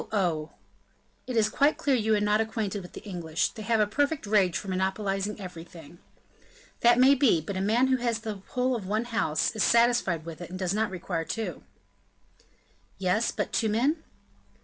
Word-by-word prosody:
oh!" 170 -7 0 0.8
"It 250 -2 -2
is 215 -1 +4
quite 285 +7 +2
clear 280 -2 +1
you 220 -2 +2
are - - +1
not 210 +1 +2
acquainted 220 -3 -3
with 180 - -12
the - - -9
English; 170 -6 -2
they 220 - -10
have 225 +1 +1
a 210 - +4
perfect 285 +6 -1
rage 200 -4 +2
for 205 - -7
monopolizing 195 +2 -1
everything." 170 -3 -10 0.8
"That 240 0 +5
may 260 +2 +7
be; 260 - +3
but 175 +5 -6
a 190 - -1
man 225 +6 +3
who 260 0 +2
has 235 -2 0
the 215 -4 -5
whole 255 0 0
of 205 -5 -5
one 215 +4 0
house, 225 -5 0
is 215 - -1
satisfied 235 -9 +3
with 165 0 -8
it, 175 - -7
and 185 - -6
does 185 0 -1
not 215 +1 0
require 175 -2 -3
two." 225 +6 -4 1.4
"Yes, 195 +5 +1
but - - -3
two 220 - +1
men?" 270 +9 +1
210 Hz, 190 wpm, -27 LUFS, 185-235 Hz, 1.4 s, may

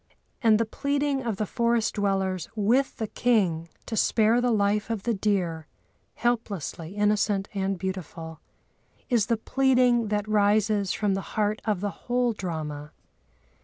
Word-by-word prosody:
And 225 -3 +5
the 230 - +2
pleading 280 +3 -1
of 230 -4 -2
the 215 - -1
forest 235 0 +1
dwellers 195 -3 -1
with 235 +6 +1
the 220 - -2
king 190 -9 +1 0.2
to 225 - -4
spare 225 +2 +3
the 245 - +2
life 210 -1 +1
of 220 -4 -3
the 235 - +1
deer, 180 -6 -1 0.5
helplessly 200 -7 -2
innocent 205 -1 +1
and 195 -1 -1
beautiful, 175 -3 -6 0.7
is 230 -4 +3
the 230 - +1
pleading 250 -1 +2
that 210 0 -1
rises 210 -1 +2
from 205 -2 0
the 195 - -1 0.2
heart 210 0 +1
of 210 -4 0
the 205 -1 -1
whole 245 +1 -1
drama. 155 -6 -5
210 Hz, 145 wpm, -26 LUFS, 190-230 Hz, 0.7 s, And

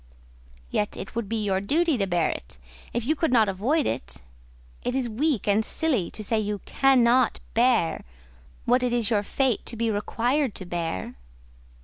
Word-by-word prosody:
"Yet 210 - -1
it 195 - -7
would 230 -3 -3
be 225 -1 -1
your 190 -1 +1
duty 315 - +2
to 195 - +1
bear 175 -3 +1
it, - - -8 0.3
if 235 -1 -2
you 310 +5 +2
could 320 -2 0
not 225 -4 +5
avoid 240 - +1
it: 60 0 -3 0.7
it 245 - -2
is 260 -2 0
weak 250 +2 -1
and 205 +2 +3
silly 250 - 0
to 215 - -7
say 220 +2 +1
you 210 -1 -2
cannot 255 -2 +3
bear 230 -8 +2 0.6
what 245 +2 +3
it 250 -1 0
is 235 -1 +1
your 210 -2 +3
fate 255 +3 0
to - - -5
be 230 0 0
required 240 +4 0
to 190 - -6
bear." 165 - -3
230 Hz, 175 wpm, -25 LUFS, 200-255 Hz, 0.7 s, not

